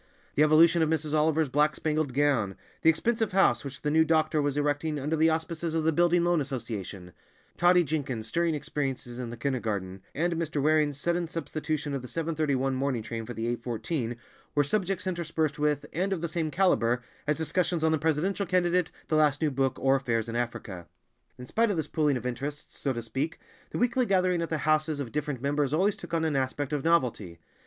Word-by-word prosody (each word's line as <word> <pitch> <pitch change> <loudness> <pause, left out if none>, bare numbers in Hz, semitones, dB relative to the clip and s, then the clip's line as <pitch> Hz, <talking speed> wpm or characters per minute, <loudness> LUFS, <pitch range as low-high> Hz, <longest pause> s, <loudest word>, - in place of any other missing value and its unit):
The - - +1
evolution 160 +2 +6
of 160 - +2
Mrs. 155 -1 -1
Oliver's 155 0 +2
black 150 +3 +2
spangled 155 -4 -1
gown, 135 -9 +2 0.3
the 160 - +5
expensive 225 +6 +1
house 195 0 +3
which 140 -1 -8
the 150 - +1
new 160 +1 +5
doctor 155 -1 +2
was 145 0 -1
erecting 150 +1 0
under 150 +4 -1
the 160 +1 +4
auspices 160 0 -2
of 160 - +1
the 160 - +3
Building 175 +1 +3
Loan 175 -2 +2
Association, 110 -9 -5 0.4
Totty 175 0 +5
Jenkins' 135 -7 -3
stirring 165 +7 0
experiences 135 -4 -4
in 125 -2 -4
the 120 - -7
kindergarten, 110 -7 -2
and 170 +3 +1
Mr. 160 -3 -2
Waring's 150 -1 +2
sudden 170 +2 0
substitution 155 -2 -3
of 135 - -2
the 125 - -8
seven 165 +4 -2
thirty 155 -3 +1
one 135 +1 0
morning 130 -3 -1
train 115 0 -5
for 120 - -6
the 115 - -3
eight 120 0 -2
fourteen, 120 +1 -3 0.4
were 145 - +4
subjects 190 +4 -1
interspersed 165 -4 -1
with, 150 -1 +1
and 185 +5 -1
of 185 -4 -1
the 170 - -1
same 160 -1 -2
calibre, 125 -9 +2 0.2
as 150 - +1
discussions 165 +1 0
on 160 - +3
the 160 - +1
presidential 165 +6 0
candidate, 180 -1 +2 0.2
the 155 - 0
last 150 -2 +3
new 150 - +2
book, 135 -1 0
or 135 0 +3
affairs 120 -4 -1
in 115 - -5
Africa. 110 -7 -4 0.5
In 125 - -8
spite 230 - +1
of 200 - -1
this 160 - 0
pooling 150 -4 +1
of 125 - -8
interests, 140 +4 -5
so 140 - 0
to 120 -2 -4
speak, 135 +7 -3 0.3
the - - -4
weekly 245 0 +2
gathering 185 -2 +2
at 165 - -2
the 160 - 0
houses 155 -1 +2
of 130 -5 -4
different 145 -3 -3
members 145 0 +1
always 195 +5 +2
took - - -11
on 160 -1 +1
an 155 -3 0
aspect 135 +2 -1
of 145 -2 -1
novelty. 125 - +1
150 Hz, 210 wpm, -28 LUFS, 130-165 Hz, 0.5 s, evolution